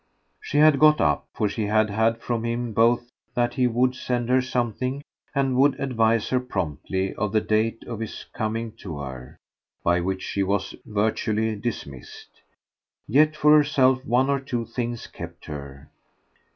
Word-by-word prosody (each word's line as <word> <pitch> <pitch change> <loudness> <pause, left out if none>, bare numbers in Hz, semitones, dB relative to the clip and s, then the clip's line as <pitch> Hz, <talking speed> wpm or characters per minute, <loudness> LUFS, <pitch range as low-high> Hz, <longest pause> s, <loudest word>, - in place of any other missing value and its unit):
She 145 - -3
had 150 -2 +6
got 155 0 +6
up, 75 -1 +1
for 105 - 0
she 105 +1 -2
had 110 0 +2
had 110 +2 +2
from 115 -2 -2
him 115 0 -2
both 120 +2 +2 0.2
that 120 0 +1
he 125 -1 +2
would 125 +2 +2
send 125 -2 -2
her 130 +1 +4
something 125 +2 -2 0.3
and 135 -2 +1
would 135 +1 +3
advise 115 -4 +1
her 130 - +2
promptly 95 - -3
of 105 -1 -2
the 110 - +3
date 110 +2 0
of 115 -3 -6
his 115 - -6
coming 110 +1 -2
to 80 -6 -7
her, 65 -3 -8 0.5
by 85 +1 +3
which 95 +1 -2
she 100 - -2
was 95 0 -1
virtually 110 +1 0
dismissed. 100 - -7 0.7
Yet 150 +5 +4
for 150 0 +5
herself 135 -3 +3
one 125 +2 +2
or 140 0 +1
two 125 -3 -3
things 120 0 -4
kept 85 0 -10
her. 70 -1 -9
115 Hz, 165 wpm, -24 LUFS, 100-130 Hz, 0.7 s, had